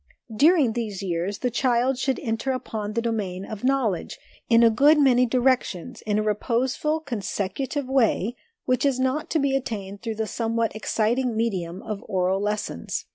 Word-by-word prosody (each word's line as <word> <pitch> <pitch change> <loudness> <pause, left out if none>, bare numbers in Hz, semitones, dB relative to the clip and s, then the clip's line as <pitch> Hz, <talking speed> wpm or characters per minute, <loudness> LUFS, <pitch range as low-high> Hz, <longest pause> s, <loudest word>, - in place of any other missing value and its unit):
During 290 -2 +4
these 215 -5 -4
years 180 +2 -2
the 250 +1 -1
child 250 +1 +1
should 265 -1 0
enter 225 +4 -1
upon 220 -4 -4
the 230 +1 -1
domain 200 -5 -2
of 215 +1 -8
knowledge, 255 -9 0 0.3
in 230 0 +6
a 230 - +6
good 285 +7 +5
many 250 -3 +4
directions, 250 -3 0
in 210 0 +1
a 215 - +1
reposeful, 255 +8 0
consecutive 250 +2 -3
way, 245 -4 +1 0.3
which 255 0 +1
is 275 -3 +2
not 260 +4 0
to - - +1
be 275 -2 +1
attained 205 -6 -4
through 225 -2 -4
the 220 0 -1
somewhat 230 0 -1
exciting 225 +2 0
medium 190 -5 -2
of 210 -2 -5
oral 190 -1 0
lessons. 210 - -3
230 Hz, 165 wpm, -24 LUFS, 210-260 Hz, 0.3 s, in